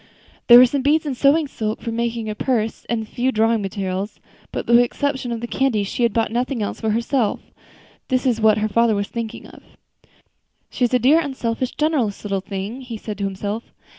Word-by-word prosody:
There 240 - +10
were 250 - +9
some 270 +2 -1
beads 305 +4 +2
and 280 -3 -2
sewing 290 +4 +3
silk 215 -4 -3
for 230 - -5
making 230 -1 -2
a 215 - -2
purse, 225 -1 -1
and 230 -2 -2
a - - -9
few 245 +4 -1
drawing 225 -1 +2
materials; 195 0 -4 0.3
but - - -4
with 235 - +5
the - - +6
exception 265 0 -2
of 230 -1 -3
the 240 - -4
candy, 240 -5 +1
she 200 - -4
had 235 -1 +3
bought 225 0 0
nothing 245 0 -1
else 205 - -5
for 220 - 0
herself. 230 +1 0 0.7
This 255 0 0
was 235 -3 +1
what 215 -1 +5
her 215 0 0
father 230 +1 +2
was 200 0 -2
thinking 230 -2 -5
of. - - -14 1.1
"She 250 - +1
is 245 - -2
a - - +6
dear, 270 +7 +4
unselfish, 255 -5 -3
generous 290 -10 0
little 195 -2 -1
thing," 200 +6 -5
he 245 -3 -7
said 210 -1 -7
to 200 - -1
himself. 205 +3 -4
230 Hz, 215 wpm, -21 LUFS, 215-255 Hz, 1.1 s, There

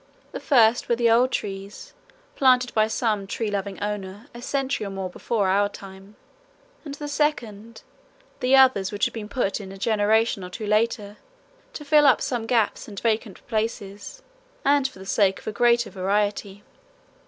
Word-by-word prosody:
The - - -6
first 240 -4 +3
were 235 - +3
the 230 -1 +2
old 245 +3 +4
trees 195 -3 -6 0.4
planted 255 -2 +3
by 215 0 +3
some 215 -3 -1
tree 215 +1 -3
loving 200 -1 -4
owner 205 +1 -5
a 240 - -10
century 270 -2 -2
or 200 - -4
more 190 -1 -5
before 210 +1 -1
our 200 +2 +2
time, 195 +1 -13 0.7
and 285 -3 -7
the 295 0 -7
second 230 -7 -2 0.6
the 255 +2 +3
others 260 -8 +4
which 205 -1 0
had - - -3
been 215 -2 -7
put 220 -5 -1
in 190 -1 -9
a 195 - -10
generation 215 0 +1
or 180 - -7
two 215 +4 -7
later 210 -1 0 0.6
to 295 - -8
fill 295 0 +5
up 265 - +5
some 235 -3 -3
gaps 230 -4 0
and 200 -2 -8
vacant 220 -3 -2
places 215 - -4 0.4
and 280 -1 +3
for 265 - -15
the 190 - -11
sake 195 -1 +2
of - - -15
a - - -3
greater 235 +1 +2
variety. 200 +1 -2
215 Hz, 175 wpm, -24 LUFS, 200-245 Hz, 0.7 s, fill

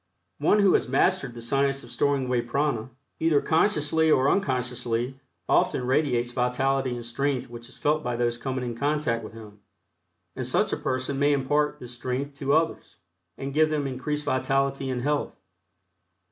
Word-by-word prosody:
One 210 - +4
who 195 -2 +5
has - - +2
mastered 160 -10 +1
the 115 - -8
science 135 +2 0
of 120 - -12
storing 140 -1 +1
away 125 -1 +1
prana, 120 -1 -1 0.3
either 160 -3 +3
consciously 160 -1 +2
or 140 -2 +4
unconsciously, 125 - -1 0.3
often 125 - +2
radiates 125 -3 +1
vitality 130 +1 0
and 120 -1 -7
strength 130 +1 -2
which 120 0 -9
is - - -14
felt 155 +1 +1
by 125 -4 -2
those 120 0 0
coming 130 -1 -3
in 120 -1 -4
contact 140 -3 0
with 110 - -9
him, 105 -2 -12 0.8
and - - -3
such - - +1
a - - 0
person 130 +1 -2
may 145 +1 +4
impart 145 +2 +1
this 125 -2 -8
strength 130 +3 -3
to 140 0 0
others, 160 0 -1 0.4
and 135 0 -5
give 155 +1 +4
them 150 -2 -1
increased 145 +3 -3
vitality 135 +1 0
and 125 -2 -2
health. 145 +1 -1
135 Hz, 170 wpm, -26 LUFS, 125-145 Hz, 0.8 s, who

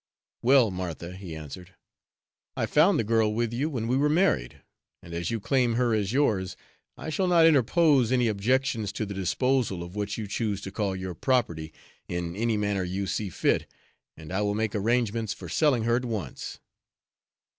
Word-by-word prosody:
"Well, 125 -3 +5
Martha," 90 -1 -5
he 95 -4 -8
answered, 85 +4 -9 0.8
"I - - +1
found 165 +7 +4
the - - +1
girl 110 0 +2
with 115 +1 -1
you 140 +6 -1
when 120 -7 -3
we 125 - +1
were 145 +2 +3
married, 150 - +1 0.4
and 85 - -10
as 85 0 -2
you 115 - -1
claim 125 +1 +1
her 120 -1 +2
as 105 -2 0
yours, 105 -9 +1 0.4
I 160 - -5
shall 185 +4 0
not 170 -2 +5
interpose 145 -3 +4
any 125 -2 +3
objections 115 +1 0
to 110 - -2
the 100 - -6
disposal 100 0 0
of 85 +3 -10
what 105 -1 -3
you 110 - -4
choose 105 0 -2
to 95 - -7
call 100 -2 -1
your 95 -1 -5
property, 85 - 0 0.4
in 85 -1 -4
any 115 +1 0
manner 100 -2 0
you 95 +2 -3
see 100 +1 -2
fit, - - 0 0.5
and 80 +2 -9
I 95 - 0
will 105 0 0
make 110 -1 -1
arrangements 115 0 0
for - - -9
selling 140 -7 +2
her 120 +1 +2
at 125 - -3
once." 105 - -5
110 Hz, 185 wpm, -27 LUFS, 95-125 Hz, 0.8 s, Well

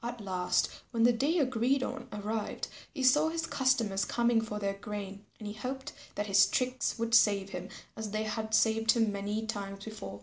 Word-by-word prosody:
At 240 0 -4
last 185 -3 +1 0.2
when 230 -2 +1
the 240 +1 +6
day 285 +9 +1
agreed 260 -1 +2
on 260 -1 -5
arrived, 210 +1 -3 0.2
he 275 -4 -4
saw 295 +5 +5
his 330 0 -2
customers 250 -10 +1
coming 235 -1 +2
for 215 -2 -4
their 200 -1 -1
grain. 200 0 -7
And 215 - -9
he 205 - -4
hoped 260 +5 -5 0.2
that 205 - -1
his 200 0 +5
tricks 255 0 0
would 230 0 -2
save 200 -4 +5
him 180 +1 -6 0.3
as 220 -1 -5
they 215 +1 -1
had 220 0 -1
saved 225 0 +4
him 225 -3 +2
many 205 +2 -2
times 195 -2 -5
before. 100 - -7
220 Hz, 195 wpm, -31 LUFS, 205-250 Hz, 0.3 s, the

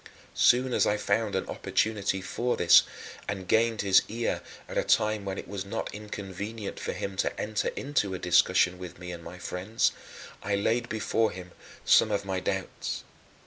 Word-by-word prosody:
As - - -10
soon 125 +1 +5
as - - +3
I 105 - +2
found 105 -1 0
an 95 - 0
opportunity 100 -3 0
for 120 +6 -1
this, 85 -1 +7 0.5
and 95 -2 -4
gained 115 +1 +3
his 95 -1 +6
ear 115 +2 -2 0.3
at - - -8
a - - +2
time 105 -1 +2
when 95 0 -3
it - - -6
was 100 -2 -4
not 100 - -4
inconvenient 105 0 -6
for - - -3
him 100 -1 -4
to - - -1
enter 105 0 -1
into 105 -9 -1
a - - -3
discussion 90 +1 +3
with 90 -1 -8
me 90 0 -7
and 85 -1 -8
my 90 - -9
friends, 95 +5 0 0.5
I 100 - 0
laid 115 +4 0
before 110 0 +1
him 90 -1 -9 0.3
some 110 - +6
of 100 -1 -1
my 95 -1 -1
doubts. 95 +1 -3
100 Hz, 185 wpm, -28 LUFS, 95-110 Hz, 0.5 s, this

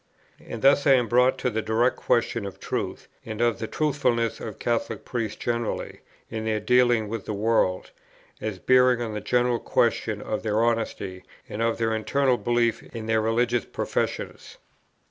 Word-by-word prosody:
And 115 - -7
thus 140 +1 +5
I 135 - +7
am 125 -3 +3
brought 125 +2 +3
to 125 - -1
the 110 0 -1
direct 115 +4 +1
question 115 -1 0
of 95 0 -10
truth, - - -4 0.2
and 110 -1 -6
of 120 -1 +1
the 110 - -3
truthfulness 125 -7 0
of 110 - -7
Catholic 115 -2 -2
priests 115 -4 -3
generally 120 -1 -3 0.3
in 110 -1 -3
their 110 -1 0
dealings 120 0 +3
with 110 -1 -5
the 105 - -3
world, 100 -3 +1 0.5
as 105 -3 -3
bearing 125 +4 +4
on 115 -3 -3
the 105 - -4
general 120 +2 +1
question 110 -2 0
of 105 +1 -3
their 110 0 +1
honesty, 110 -5 -2 0.2
and 105 - -5
of 115 0 +1
their 115 -1 0
internal 125 +4 +1
belief 120 -1 +1
in 115 -2 -8
their 110 0 +2
religious 115 +2 +1
professions. - - -3
115 Hz, 170 wpm, -25 LUFS, 110-120 Hz, 0.5 s, I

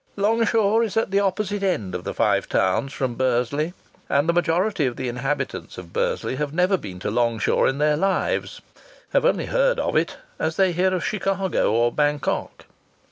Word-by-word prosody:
Longshaw 220 0 +2
is 225 -2 -1
at 225 - +1
the 200 - +3
opposite 200 +1 -1
end 115 - -1
of - - -5
the - - -3
Five - - +1
Towns 135 - +1
from 130 -3 -2
Bursley, 130 +7 0 0.3
and 140 +3 +2
the 170 - +3
majority 175 -1 +1
of 120 - -3
the 130 - -4
inhabitants 130 +4 -3
of - - -10
Bursley 485 - -1
have 150 0 -2
never 180 +2 +3
been 95 - -7
to 105 - -2
Longshaw 115 -1 +1
in 135 - +1
their 150 0 +2
lives, 195 +3 -1 0.5
have - - +3
only - - +2
heard - - +2
of - - -1
it, - - +1 0.2
as 160 0 -1
they 190 -2 +3
hear 180 +2 +1
of 180 - -2
Chicago 195 - 0
or 120 +2 +2
Bangkok. 145 -1 -1
170 Hz, 185 wpm, -23 LUFS, 135-200 Hz, 0.5 s, the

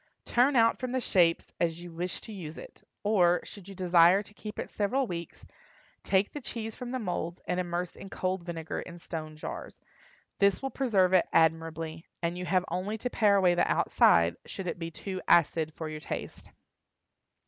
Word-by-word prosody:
Turn 260 +4 +3
out 230 -1 +4
from 255 -1 -3
the 260 - +1
shapes 175 -8 +2
as 165 -1 0
you 175 0 -9
wish 175 +2 -4
to 220 - -9
use 165 -6 -7
it; - - -11 0.2
or, 180 -4 +4
should 200 -2 -10
you 195 - -9
desire 180 +1 +5
to 210 - -16
keep 210 0 -8
it - - -3
several 250 +6 0
weeks, 170 -5 -7 0.6
take 195 +1 +2
the 295 - -6
cheese 225 -3 -5
from 250 - -6
the 255 - -2
moulds 175 -6 -3
and 180 - -1
immerse 175 -1 -3
in 195 - -10
cold 185 -1 -2
vinegar 165 -2 -5
in 175 -1 -9
stone 155 -2 -6
jars. 155 - -7 0.6
This 200 -2 +4
will 270 0 -4
preserve 195 -9 +2
it 185 - +5
admirably, 160 0 +1 0.2
and 170 +1 0
you 180 0 -4
have 185 -1 +2
only 190 +5 -2
to 250 +3 -4
pare 205 -3 +4
away 185 -3 +4
the 175 - +2
outside, 85 0 +4
should 195 - -6
it 170 -1 -3
be 165 -1 -4
too 185 +3 -6
acid 160 -1 +4
for 160 - -5
your 155 0 -6
taste. - - -6
180 Hz, 190 wpm, -29 LUFS, 170-205 Hz, 0.6 s, desire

